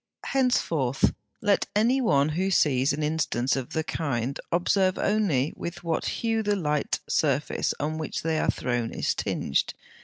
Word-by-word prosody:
Henceforth 165 - +1 0.3
let 205 -2 +2
any 240 +6 +3
one 145 - +3
who 180 +5 0
sees 135 -7 +3
an 150 +2 -2
instance 150 -5 0
of 130 -3 -5
the 160 - 0
kind 135 -5 -2
observe 185 +2 +2
only 190 -10 +1
with 175 +1 -6
what 165 -1 -1
hue 225 -1 0
the 205 -1 +1
light 150 -6 -1
surface - - +1
on 155 +2 -2
which 155 - -4
they 160 -1 0
are - - 0
thrown 120 -2 -1
is - - -1
tinged. 70 - -1
160 Hz, 155 wpm, -26 LUFS, 140-200 Hz, 0.3 s, any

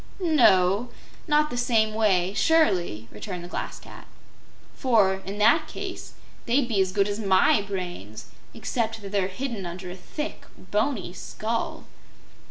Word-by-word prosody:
"No; 235 - +4 0.4
not 300 0 +3
the 245 - -3
same 225 -3 +2
way, 195 -4 +2
surely," 185 - +2
returned 180 -4 -6
the - - -7
Glass - - -5
Cat; - - -13 0.7
"for, 205 -7 +2
in 200 +1 -4
that 235 +10 +4
case, - - -7 0.3
they'd 245 +2 +2
be 210 -5 +2
as 190 -1 +1
good 200 +1 +2
as 205 +1 -3
MY 195 +1 +4
brains, 180 - -6 0.3
except 225 -3 -2
that 195 - -7
they're 200 -2 +1
hidden 225 +1 -4
under 180 +1 -7
a - - -7
thick, 300 - -6
boney 210 -4 -2
skull." 225 +4 -4
205 Hz, 145 wpm, -25 LUFS, 185-240 Hz, 0.7 s, No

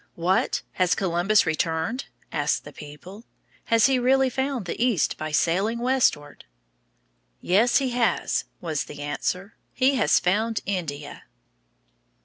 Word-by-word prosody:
"What! 180 +3 0
has 185 -1 +1
Columbus 190 +3 +2
returned?" 160 - -1 0.3
asked - - 0
the - - -11
people. 150 +9 -11 0.4
"Has 230 -2 +4
he 265 -2 +3
really 260 +1 +3
found 265 -5 -2
the 180 - -2
East 235 -10 +1
by 155 0 -5
sailing 190 +9 +1
westward?" 240 - 0 0.9
"Yes, 215 +7 +3
he 265 -2 0
has," 240 -1 0
was 160 -4 -3
the 145 0 -8
answer. 180 +7 -3 0.2
"He 265 +1 +3
has - - +3
found 215 +5 0
India." 150 -7 -5
195 Hz, 125 wpm, -24 LUFS, 165-245 Hz, 0.9 s, Has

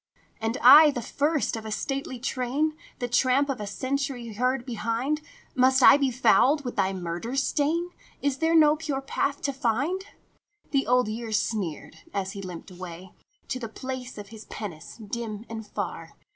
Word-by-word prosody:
" - - -35
And 225 +3 -1
I, 305 +1 +10
the 250 -4 -2
first 290 +2 0
of 225 - -6
a 220 - -6
stately 270 +4 -3
train, 265 +5 -1 0.2
The 245 - -2
tramp 255 +3 +2
of 260 -5 -2
a 205 - -4
century 260 +1 -3
heard 250 +3 0
behind, 240 +5 -1 0.3
Must 260 0 +4
I - - +9
be 275 -2 +1
fouled 270 +3 +3
with 245 - -4
thy 190 - +2
murder 180 +6 -4
stain? 305 +5 0 0.3
Is 280 -2 0
there 325 +1 +2
no 305 -2 +6
pure 300 -4 -3
path 280 +1 -2
to 280 - 0
find? 280 - -1 0.3
" 415 0 -41
The 275 -2 +1
Old 250 -2 +3
Year 225 +1 -4
sneered 210 -8 -2 0.2
as 195 -1 -1
he 200 - -7
limped 180 -1 -8
away 180 0 -9 0.4
To 255 - -2
the 230 -3 -5
place 260 +1 -6
of 205 -1 -8
his 220 -1 -11
penance 175 -8 -8
dim 220 0 -5
and 220 -1 -7
far. - - -5
250 Hz, 180 wpm, -26 LUFS, 215-280 Hz, 0.4 s, I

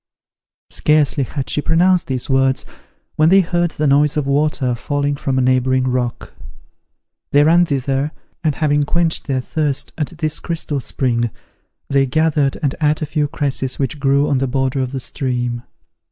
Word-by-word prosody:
Scarcely 150 -2 +2
had 135 +1 -5
she 150 - 0
pronounced 175 +3 +2
these 130 -2 -3
words 135 -1 +1 0.5
when 155 +1 +4
they 195 +2 +6
heard 175 -1 0
the 155 -1 -3
noise 145 +1 +3
of 150 - 0
water 140 -2 +1
falling 145 +4 -1
from 135 -1 -2
a 130 - +2
neighbouring 130 0 +2
rock. 125 -1 -2 1.0
They 145 +1 +5
ran 170 +3 +5
thither 135 +1 -1 0.3
and 155 -4 +1
having 145 -1 +1
quenched 165 +3 0
their 130 -2 0
thirst 145 0 -2
at 150 - 0
this 155 -2 -2
crystal 160 -4 -3
spring, 120 -2 -1 0.6
they 135 -1 +2
gathered 150 -1 +1
and 140 -2 +1
ate 155 +1 +1
a - - 0
few 150 0 -1
cresses 140 -3 -1
which 140 +2 -2
grew 140 +1 +2
on 135 - +1
the 135 - 0
border 135 +1 -1
of 130 -1 -2
the 135 - -3
stream. 125 -3 -3
140 Hz, 170 wpm, -18 LUFS, 130-155 Hz, 1.0 s, they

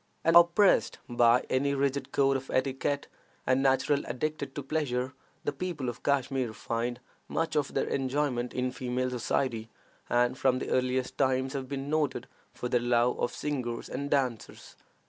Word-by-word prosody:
Unoppressed 170 +4 +5
by 120 0 +4
any 140 +2 +1
rigid 140 0 -1
code 135 0 +3
of 135 0 -4
etiquette, 135 +2 0 0.4
and 130 +1 +3
naturally 140 +2 +2
addicted 140 +2 -3
to 145 - -4
pleasure, 130 -3 -1 0.3
the - - 0
people 145 -4 -3
of 120 - -7
Kashmir 135 -4 0
find 120 +2 -3 0.3
much 165 - -1
of 145 -2 0
their - - +2
enjoyment 130 -2 -1
in 125 0 -1
female 125 0 -2
society, 120 -2 -1 0.4
and 120 +1 +2
from 130 -1 +3
the - - -4
earliest 130 0 0
times 130 0 +1
have 135 -2 -4
been 140 0 -4
noted 150 -2 0 0.3
for 125 - -4
their 125 0 +2
love 120 0 +2
of - - 0
singers 125 -6 -3
and 140 0 -4
dancers. 125 -7 -2
130 Hz, 155 wpm, -29 LUFS, 125-140 Hz, 0.4 s, Unoppressed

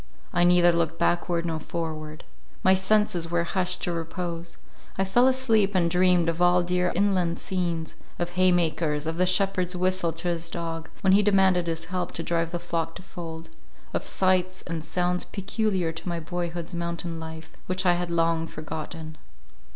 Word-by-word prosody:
I 175 - +3
neither 175 0 +6
looked 165 -1 0
backward 170 -1 +1
nor 165 -2 -2
forward; 155 -1 -5 0.4
my 190 - +6
senses 190 -3 +2
were 170 0 +1
hushed 180 +1 -1
to 175 - 0
repose; 170 0 -4 0.4
I 195 - +2
fell 240 +7 +4
asleep 225 -6 +3
and 170 -2 +2
dreamed 180 -1 +3
of 165 +1 -1
all 175 0 +5
dear 180 0 +1
inland 185 -3 +1
scenes, 170 -3 -2 0.2
of 175 0 -2
hay 185 +1 +4
makers, 160 -3 +1
of 160 +1 -2
the 185 +1 +3
shepherd's 185 -1 +2
whistle 185 -1 +1
to 165 +2 -5
his 170 -1 -2
dog, 165 -1 -5
when 190 -1 +4
he 200 - +6
demanded 190 -3 +3
his 165 -1 -2
help 180 +1 -3
to 165 - -3
drive 165 -1 0
the 175 - -1
flock 165 -1 -3
to - - -10
fold; 165 -3 -8 0.4
of - - -2
sights 185 0 +1
and 165 -2 -4
sounds 180 +1 0
peculiar 195 -3 -1
to 165 +2 -7
my 170 -1 -2
boyhood's 170 +1 -4
mountain 170 -1 -3
life, 160 0 -8 0.2
which 185 +1 -1
I 180 - +5
had 175 0 -2
long 165 -1 +1
forgotten. 155 0 -7
175 Hz, 175 wpm, -26 LUFS, 165-185 Hz, 0.4 s, neither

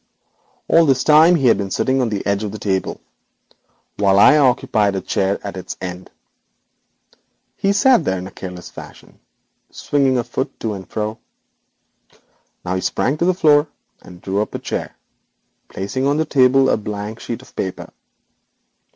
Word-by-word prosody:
All 165 -1 +4
this 130 -2 +2
time 160 +3 +6
he 140 -6 0
had 115 -4 +4
been 100 -1 -3
sitting 130 +6 0
on 120 - 0
the 105 -2 -4
edge 100 +1 0
of 105 - -4
the 110 - -7
table, 95 -2 -2 1.0
while 100 -1 +3
I 145 +9 +7
occupied 115 -7 +2
a 95 - -2
chair 95 +1 -1
at 100 - -5
its 95 - -7
end. 90 0 -7 1.5
He 195 - 0
sat 205 0 +4
there 95 -9 -1
in 90 +1 -6
careless 90 -2 -9
fashion, - - -13 0.5
swinging 135 -3 0
a 120 - 0
foot 130 - -5
to 110 -2 -2
and 95 -2 -9
fro. 110 +1 -4 1.5
Now 90 - -2
he 95 - -2
sprang 140 +10 -1
to 170 - +1
the 185 0 +2
floor, 150 -3 +4 0.3
and 90 -1 -14
drew 100 +2 -1
up 105 - -5
a - - -1
chair, - - -5 0.7
placing 130 +8 -3
on 145 +1 +1
the 160 - +1
table 135 -2 +4
a - - +2
blank 105 +1 -6
sheet 120 +2 -6
of - - -20
paper. 95 -1 -5
110 Hz, 170 wpm, -19 LUFS, 100-140 Hz, 1.5 s, I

